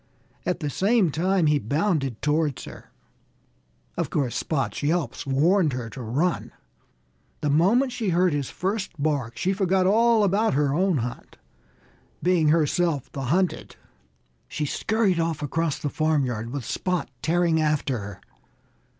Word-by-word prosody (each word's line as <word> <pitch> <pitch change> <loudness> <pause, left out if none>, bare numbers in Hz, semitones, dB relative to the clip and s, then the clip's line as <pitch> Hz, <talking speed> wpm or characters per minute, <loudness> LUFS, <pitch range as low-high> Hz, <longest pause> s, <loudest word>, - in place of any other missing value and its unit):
At 180 - -1
the 150 - -1
same 195 - +2
time 180 +3 +1
he 150 -1 +3
bounded 140 - -1
towards 150 -2 0
her. - - -12 1.1
Of - - -2
course 130 -5 -1
Spot's 140 -5 -2
yelps 155 -1 -1
warned 155 +4 +3
her 120 -2 -5
to 130 - -8
run. 140 +10 -1 0.9
The 150 - 0
moment 215 - +3
she 235 -5 -2
heard 180 -1 +2
his 145 -3 -2
first 195 +2 -3
bark 140 -6 -1
she 190 +8 0
forgot 190 -1 +1
all 225 +2 +4
about 200 -3 +2
her 140 -1 +2
own 185 +1 +2
hunt, 120 - -9 0.9
being 175 -3 +3
herself 160 -1 +1
the 135 -1 -5
hunted. 180 +7 0 0.7
She 150 - -3
scurried 200 +3 0
off 165 -2 -1
across 160 +1 -1
the - - -4
farmyard, 135 -7 -1
with 140 -4 -5
Spot 180 - -2
tearing 165 0 +2
after 150 -5 0
her. 100 -1 -8
160 Hz, 140 wpm, -25 LUFS, 140-185 Hz, 1.1 s, all